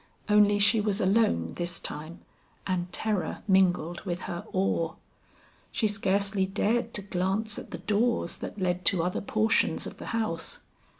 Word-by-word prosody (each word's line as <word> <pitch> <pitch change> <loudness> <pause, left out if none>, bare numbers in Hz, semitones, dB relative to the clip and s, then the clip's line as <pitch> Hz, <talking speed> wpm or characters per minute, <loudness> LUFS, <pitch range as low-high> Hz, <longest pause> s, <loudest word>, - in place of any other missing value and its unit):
Only 210 -1 +5
she 205 +2 +4
was 205 -1 0
alone 185 - +2
this 175 0 -2
time, 155 +3 -5 0.4
and 180 -1 -1
terror 210 -3 -2
mingled 180 -3 +3
with 180 -2 -4
her 175 0 -5
awe. 170 -3 0 0.8
She 220 - +1
scarcely 200 -1 0
dared 225 +4 0
to 205 - -1
glance 195 +3 -1
at - - -10
the 170 - -5
doors 210 +1 0
that - - -7
led 180 -1 0
to 175 -3 +4
other 180 +1 -1
portions 220 +2 +1
of - - -8
the - - -7
house. 220 -8 -2
195 Hz, 155 wpm, -28 LUFS, 175-210 Hz, 0.8 s, Only